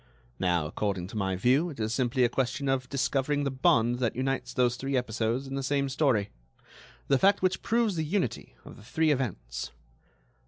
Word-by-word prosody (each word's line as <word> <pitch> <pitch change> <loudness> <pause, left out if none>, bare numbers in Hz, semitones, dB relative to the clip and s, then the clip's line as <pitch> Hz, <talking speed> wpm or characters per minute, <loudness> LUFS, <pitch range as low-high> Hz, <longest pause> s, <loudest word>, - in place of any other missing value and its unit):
Now, 90 -4 +1
according 95 +3 -2
to - - -10
my 95 -3 0
view, 130 - +2
it 145 - -9
is 110 +1 -1
simply 130 +1 +1
a - - +5
question 135 +3 -2
of 130 -1 0
discovering 140 +1 0
the 140 - -1
bond 120 -2 +2
that 120 -4 0
unites 135 +2 -2
those 125 -2 +2
three 135 +2 -2
episodes 120 +1 -1
in 135 - -7
the 135 - -2
same 140 +1 0
story—the 100 - -2
fact 195 0 +3
which 185 0 +1
proves 230 -4 +1
the 160 - 0
unity 165 - -2
of - - -11
the - - -14
three 155 +7 +1
events. 100 - -3
130 Hz, 185 wpm, -28 LUFS, 110-140 Hz, -, a